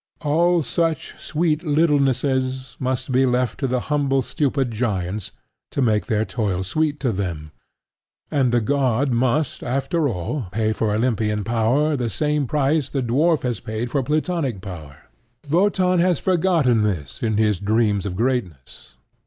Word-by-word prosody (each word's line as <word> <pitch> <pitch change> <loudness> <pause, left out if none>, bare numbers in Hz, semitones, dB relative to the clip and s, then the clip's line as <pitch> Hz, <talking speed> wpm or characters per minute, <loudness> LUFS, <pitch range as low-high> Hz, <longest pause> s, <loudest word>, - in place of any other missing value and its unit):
All 170 +3 +2
such 165 +3 -1
sweet 160 -1 0
littlenesses 135 -4 +1
must 130 0 -2
be 130 +1 +3
left 125 0 0
to 135 - 0
the 125 0 0
humble 140 -3 +1
stupid 135 -4 -1
giants 105 -4 -2 0.4
to - - -4
make 110 -5 +2
their 110 -2 +1
toil 100 -7 -2
sweet 150 +9 -1
to 125 - +1
them; 85 -7 -4 0.8
and 130 -4 +2
the 120 -1 +2
god 135 +1 +1
must, 130 +5 0
after 140 +4 0
all, 110 - -3
pay 110 +2 0
for 110 -1 -1
Olympian 105 -2 0
power 120 +8 +1
the 120 -4 -1
same 150 +2 0
price 145 +1 +1
the 135 -2 -2
dwarf 150 +7 +2
has 120 -4 -1
paid 110 +2 -4
for 140 - +1
Plutonic 150 - -1
power. 80 -7 -9 0.5
Wotan 185 0 +3
has 175 -1 +3
forgotten 165 - +2
this 90 -10 -2
in 110 -3 0
his 105 -4 +2
dreams 105 -1 +1
of 90 - -4
greatness. 90 - -3
130 Hz, 150 wpm, -22 LUFS, 110-150 Hz, 0.8 s, be